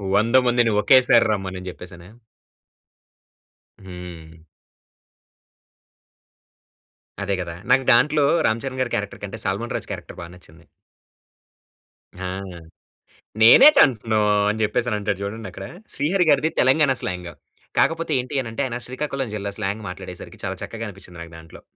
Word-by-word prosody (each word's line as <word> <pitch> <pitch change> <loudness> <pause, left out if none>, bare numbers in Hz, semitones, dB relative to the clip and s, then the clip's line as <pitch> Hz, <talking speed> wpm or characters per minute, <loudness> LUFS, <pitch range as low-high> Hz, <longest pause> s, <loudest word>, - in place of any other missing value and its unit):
వందమందిని 120 +1 +3
ఒకేసారి 130 +1 +5
రమ్మనని 95 -2 -4
చెప్పేసనా? 90 -1 -12 1.8
హ్మ్. 85 -3 -10 2.9
అదే 100 0 -1
కదా! 85 -1 -6 0.2
నాకు 130 0 +4
దాంట్లో 150 +4 +3 0.2
రామ్ 110 +1 -1
చరణ్ 130 -1 -5
గారి 120 - -2
క్యారెక్టర్ 105 0 -5
కంటే 105 +2 -6
సల్మాన్ 100 +5 -2
రాజ్ - - -10
క్యారెక్టర్ - - -8
బా - - -7
నచ్చింది. 80 -2 -19 1.5
ఆ! 95 +1 -6 1.2
"నేనేటి 275 - +8
అంటున్నావు" 110 -4 -1 0.2
అని 110 +1 -3
చెప్పేసనంటాడు 105 -3 -1
చూడండక్కడ 110 +3 -7 0.3
శ్రీహరి 180 +6 +1
గారిది 150 +2 +2
తెలంగాణ 135 +2 +4
స్లాంగు. 90 -2 -5 0.4
కాకపోతే 165 -1 +1
ఏంటి 135 +2 -3
అనంటే 115 +2 -4
ఆయన 120 -2 -4
శ్రీకాకుళం 135 0 -4
జిల్లా 100 -1 -4
స్లాంగ్ 100 +2 -3
మాట్లాడేసరికి 90 - -10
చాలా - - -3
చక్కగా 115 0 -7
అనిపించింది 90 -3 -12
నాకు 85 0 -10
దాంట్లో. 80 0 -14
110 Hz, 115 wpm, -22 LUFS, 95-130 Hz, 2.9 s, నేనేటి